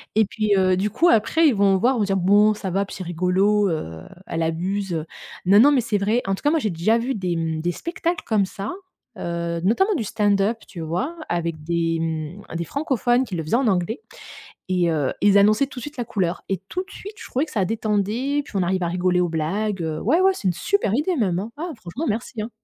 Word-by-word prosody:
et 220 0 +5
puis, 210 +1 0
heu, 185 -1 +3
du 195 +3 0
coup, 320 - +2
après, 320 +5 +4
ils 270 - +3
vont 195 -1 +4
voir, 250 +7 +2
ils - - -1
vont - - +3
dire: 195 -1 0
«Bon, 205 +4 +5
ça 200 -2 -5
va, 195 +2 +1
puis - - -9
c'est 185 - -5
rigolo, 185 +4 +2
heu, 80 - -4 0.3
elle 165 0 -2
abuse». 175 0 -2 0.4
Non 195 +3 +6
non 285 +4 +7
mais 270 -4 +3
c'est 215 -2 0
vrai. 210 +5 +1
En 195 - +1
tout - - -12
cas, 295 - +4
moi, 320 +1 +2
j'ai 220 - -1
déjà 175 +7 +2
vu 245 +3 -2
des, 180 -4 -2
mmh, 160 -1 -2
des 175 +2 0
spectacles 340 - -3
comme 210 -3 +2
ça, 195 +2 -6 0.4
heu, 170 -1 -3
notamment 310 - +3
du 245 - -1
stand-up, 205 +2 +1
tu 180 - -10
vois? 180 - -2
Avec 170 -2 -2
des, 165 0 0
mmh, 160 +4 -4
des 170 - -1
francophones 260 - +1
qui 195 - -6
le 165 - -2
faisaient 155 - 0
en 255 0 +2
anglais 190 - 0 0.7
et 180 -2 +2
heu, 150 -5 0
ils 205 0 +5
annonçaient 215 +6 +4
tout 270 - -10
de - - -6
suite 295 +4 -8
la 245 - -2
couleur. 190 -7 -2
Et 195 - -1
tout 370 +2 -3
de 390 - -21
suite, 410 +2 -9
je - - -9
trouvais 265 +4 0
que 310 - -13
ça 200 -4 +1
détendait. 220 +7 0
Puis - - -15
on 190 - +2
arrive 185 +1 0
à 170 - 0
rigoler 180 +1 +1
aux 175 - +1
blagues, 185 +5 -1
heu, 160 -1 -3
ouais, 300 - +2
ouais, 385 +1 +5
c'est 200 - -2
une - - +2
super 400 - 0
idée 315 +8 +1
même, 190 - +1
hein. 210 +5 -4
Ah 340 +3 -4
franchement, 220 - -5
merci, 225 +2 -3
hein. 220 - -5
200 Hz, 245 wpm, -23 LUFS, 175-240 Hz, 0.7 s, non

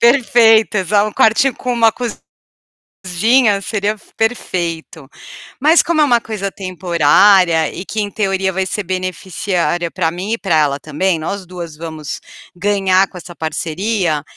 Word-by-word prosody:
Perfeito, 230 -3 +4
exa 200 +2 +2
um 215 - -4
quartinho 225 +4 +3
com 250 - -3
uma 230 -2 +4 0.9
cozinha, 205 +4 +1
seria 205 0 -1
f 215 - -20
perfeito, 170 - -3 0.5
mas 310 +5 +5
como 330 -2 0
é - - +6
uma 245 -4 +3
coisa 210 -4 -5
temporária 180 -2 +3
e 185 - -7
que 215 +1 -3
em 205 - -4
teoria, 195 -2 -1
vai 190 +1 -2
ser 210 +2 -3
beneficiária 185 -1 -2
para 165 -3 -1
mim 185 +6 -4
e 230 - -1
para 190 -7 -1
ela 145 -2 +1
também, 165 +4 -1
nós 185 +4 -5
2 175 -3 -8
vamos 160 -2 -7 0.4
ganhar 195 0 +2
com 180 - -13
essa 175 0 -11
parceria, 160 +1 -2
190 Hz, 150 wpm, -16 LUFS, 170-215 Hz, 0.9 s, é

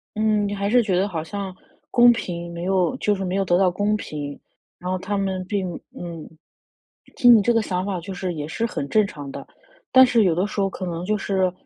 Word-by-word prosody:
嗯， 215 -1 +1
你 205 - -3
还 200 0 -1
是 245 +3 +5
觉 205 -5 0
得 190 +2 +2
好 165 -6 -4
像 195 +2 -6 0.4
公 240 0 +7
平 170 -6 -4
没 170 0 -6
有 190 +5 +1
就 210 - +1
是 195 - -4
没 185 0 -2
有 195 0 +1
得 175 -1 +3
到 190 0 +4
公 205 +4 0
平， 145 -7 -6 0.4
然 180 - -5
后 185 - 0
他 200 +2 -3
们 190 -2 -2
并 185 -2 -2 0.2
嗯。 170 -3 -7 0.9
听 245 -1 +7
你 220 - +5
这 220 - +2
个 230 - +3
想 185 -3 -2
法 195 -3 -2
就 195 +3 -7
是 180 -1 -4
也 150 -1 -4
是 225 +8 -2
很 140 -10 -4
正 215 +5 +3
常 145 -6 -8
的， - - -8 0.5
但 260 0 +8
是 235 -3 +3
有 170 -3 +2
的 180 +3 +1
时 205 0 -3
候 195 - +1
可 190 - -6
能 170 -1 -4
就 210 +3 0
是 190 -2 0
190 Hz, 255 characters per minute, -23 LUFS, 175-210 Hz, 0.9 s, 但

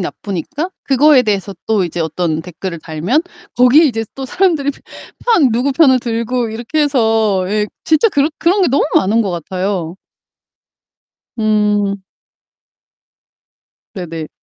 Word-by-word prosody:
나쁘니까 205 - -4
그거에 275 0 +4
대해서 200 -3 -2
또 210 -4 +1
이제 170 0 -4
어떤 160 0 -2
댓글을 180 -1 -7
달면 175 - -1 0.3
거기에 250 +6 +6
이제 225 -5 0
또 270 - -5
사람들이 320 -5 +1 0.5
편 335 - +3
누구 250 +5 0
편을 265 -3 +4
들고 235 0 -2
이렇게 235 +7 -3
해서 225 -8 +1
예 210 0 0 0.2
진짜 315 +7 +3
그런 290 -3 +1
그런 375 +4 +2
게 - - +3
너무 275 - +2
많은 220 +4 +3
것 195 - -2
같아요. 180 0 -3 1.4
음. 210 -2 +1 1.9
네네. 165 -4 -6
225 Hz, 255 characters per minute, -16 LUFS, 190-275 Hz, 1.9 s, 거기에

